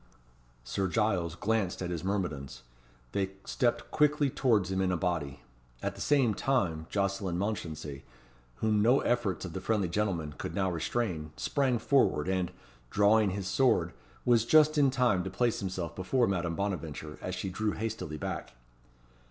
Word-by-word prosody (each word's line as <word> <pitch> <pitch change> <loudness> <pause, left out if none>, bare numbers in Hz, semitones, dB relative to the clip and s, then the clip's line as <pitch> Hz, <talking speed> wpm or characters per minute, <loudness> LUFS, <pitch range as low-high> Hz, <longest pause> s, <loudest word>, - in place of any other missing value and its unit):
Sir 95 +10 -1
Giles 95 -5 0
glanced 105 -2 0
at 90 -1 -3
his 85 -3 -3
myrmidons. 75 -11 -3 0.5
They 95 -1 -1
stepped 120 -2 0
quickly 150 -2 +3
towards 105 -9 +2
him 95 0 0
in 95 -1 +1
a 90 - +1
body. 80 -6 -2 0.4
At - - -1
the - - -10
same 135 -6 +3
time 90 -11 0
Jocelyn 100 -3 -1
Mounchensey, 80 -8 -4 0.5
whom 105 - +1
no 120 +5 +4
efforts 120 -6 0
of 80 - -7
the 95 - -4
friendly 105 -3 +1
gentleman 85 -5 -1
could - - -4
now 95 -2 +1
restrain, 85 -3 -2
sprang 135 -4 +1
forward, 110 - +2
and, 95 -2 0 0.4
drawing 105 - +4
his 95 0 -3
sword, 90 -9 +2 0.3
was 120 -3 +5
just 155 +4 +5
in 145 -2 +5
time 125 -8 +2
to 95 - -4
place 120 +4 0
himself 95 -4 -4
before 120 +7 +1
Madame 85 -4 -1
Bonaventure, 80 -6 -4
as - - -3
she 95 - -4
drew 105 +2 -1
hastily 110 -8 -4
back. - - -5
95 Hz, 160 wpm, -30 LUFS, 85-115 Hz, 0.5 s, was